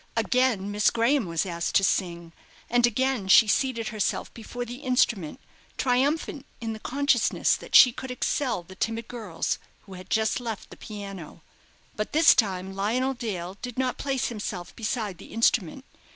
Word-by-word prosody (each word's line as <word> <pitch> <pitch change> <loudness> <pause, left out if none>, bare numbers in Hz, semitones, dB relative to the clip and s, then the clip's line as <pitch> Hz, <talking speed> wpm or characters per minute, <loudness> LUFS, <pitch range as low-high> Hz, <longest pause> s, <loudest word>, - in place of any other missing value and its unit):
Again 250 -6 +1
Miss 210 +1 +3
Graham 235 0 +1
was 165 0 -1
asked 170 -2 -3
to 195 - +5
sing, 170 -3 -1 0.4
and 240 0 +5
again 250 -3 0
she 215 +3 +7
seated 230 0 0
herself 215 -2 -2
before 245 +2 -6
the 245 +1 -7
instrument, 250 - 0 0.4
triumphant 275 +3 0
in 225 -1 -4
the 220 - -8
consciousness 275 -1 +2
that - - -6
she 250 - +9
could 260 +2 -8
excel 250 -4 -1
the 190 - -13
timid 225 +4 -3
girls 220 -8 -3 0.2
who 195 - -13
had 185 0 -11
just 220 +2 +1
left 230 -4 -6
the - - -9
piano. 195 -7 -9 0.5
But 215 - -4
this 315 +2 +7
time 190 -3 0
Lionel 235 +7 0
Dale 200 -7 -5
did 250 -1 -6
not 255 -1 -1
place 270 -2 -1
himself 205 -6 -6
beside 215 -5 -3
the - - -12
instrument. 230 +1 +1
225 Hz, 165 wpm, -26 LUFS, 195-250 Hz, 0.5 s, she